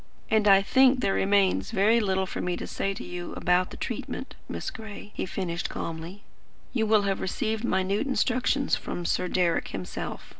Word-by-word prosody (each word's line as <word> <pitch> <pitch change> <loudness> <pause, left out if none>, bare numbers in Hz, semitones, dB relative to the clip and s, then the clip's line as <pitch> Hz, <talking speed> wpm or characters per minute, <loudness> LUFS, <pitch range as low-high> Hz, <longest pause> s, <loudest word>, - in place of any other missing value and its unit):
"And 215 -1 +4
I 195 -1 +7
think 260 +4 +4
there 195 - +2
remains 195 - +2
very 215 +4 +4
little 190 -3 +1
for - - -5
me 180 0 -1
to - - -5
say 195 0 -2
to - - -6
you 175 0 -6
about 180 +1 +2
the - - -9
treatment, - - -5 0.2
Miss - - -4
Gray," 215 -2 -9
he - - -3
finished 180 -2 -3
calmly. 165 +5 -6 0.5
"You 225 -4 +1
will 215 -1 +4
have 195 -1 -1
received 220 +3 -2
minute 195 +3 +1
instructions 265 +1 +1
from 175 - -5
Sir 180 - 0
Deryck 175 -2 +1
himself. 95 -2 -5
195 Hz, 180 wpm, -27 LUFS, 180-220 Hz, 0.5 s, I